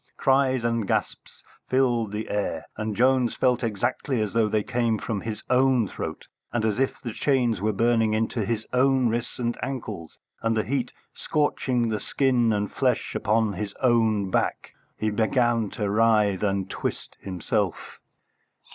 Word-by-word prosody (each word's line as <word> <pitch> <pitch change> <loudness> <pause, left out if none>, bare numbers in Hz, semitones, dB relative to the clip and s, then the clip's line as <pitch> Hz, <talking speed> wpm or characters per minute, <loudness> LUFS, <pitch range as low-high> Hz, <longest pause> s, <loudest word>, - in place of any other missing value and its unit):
Cries 130 -2 +2
and 115 -3 0
gasps - - -3 0.3
filled 120 -5 +2
the 105 +1 -4
air, 100 -6 -2
and 110 -1 -3
Jones 125 +1 +3
felt 125 -1 +1
exactly 115 +4 -1
as 105 -2 -1
though 115 -2 +2
they 105 0 +1
came 120 -2 0
from 105 -2 -3
his 110 -1 -5
own 130 -3 +3
throat, - - -6 0.3
and 115 -2 0
as 110 +1 0
if 135 - 0
the 120 -4 -6
chains 125 -7 +1
were 110 +1 +1
burning 115 +1 +2
into 110 +1 -1
his 110 +1 -2
own 130 -1 +3
wrists 115 +1 -3
and 120 -1 -1
ankles, 110 - -5 0.2
and 115 0 +1
the 110 - +2
heat 125 -1 -2 0.2
scorching 130 -5 0
the 110 -1 -1
skin 125 0 +2
and 105 -1 -1
flesh - - 0
upon 110 -1 +1
his 100 +2 -5
own 110 -5 +2
back. - - -1 0.3
He 110 0 -1
began 115 0 +1
to 105 - -1
writhe 105 -2 +3
and 100 -2 0
twist - - -5
himself. 90 -3 -3
115 Hz, 160 wpm, -25 LUFS, 105-125 Hz, 0.3 s, Jones